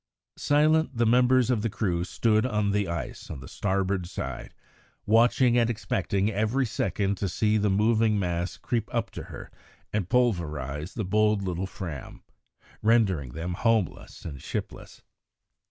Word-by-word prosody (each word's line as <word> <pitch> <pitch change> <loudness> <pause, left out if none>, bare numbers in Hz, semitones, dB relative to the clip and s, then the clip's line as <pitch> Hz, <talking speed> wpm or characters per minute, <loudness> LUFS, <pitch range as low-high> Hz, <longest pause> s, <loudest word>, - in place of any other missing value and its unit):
Silent 150 -2 +3
the 120 - +3
members 125 +2 +4
of 115 -4 +1
the 115 - 0
crew 90 -4 -1
stood 110 +3 +1
on 105 -5 0
the 100 -1 0
ice 85 -6 -5
on 75 - -6
the 65 - -10
starboard 95 -2 -1
side - - -6 0.5
watching 120 +2 +4
and 115 -1 +2
expecting 100 -2 -1
every 110 +6 +1
second 100 -2 -1
to 100 - -1
see 105 +4 +1
the 105 -1 +2
moving 110 +2 +3
mass 90 -2 -2
creep 115 -2 -2
up 115 -3 -1
to - - -7
her - - -10 0.4
and 100 -4 -1
pulverise 80 - 0
the 110 - -2
bold 105 +1 +2
little 90 0 -2
Fram, 85 -8 -8 0.6
rendering 100 - +2
them 85 +3 -4
homeless 110 -1 -1
and 70 -5 -7
shipless. - - -6
105 Hz, 150 wpm, -27 LUFS, 90-115 Hz, 0.6 s, members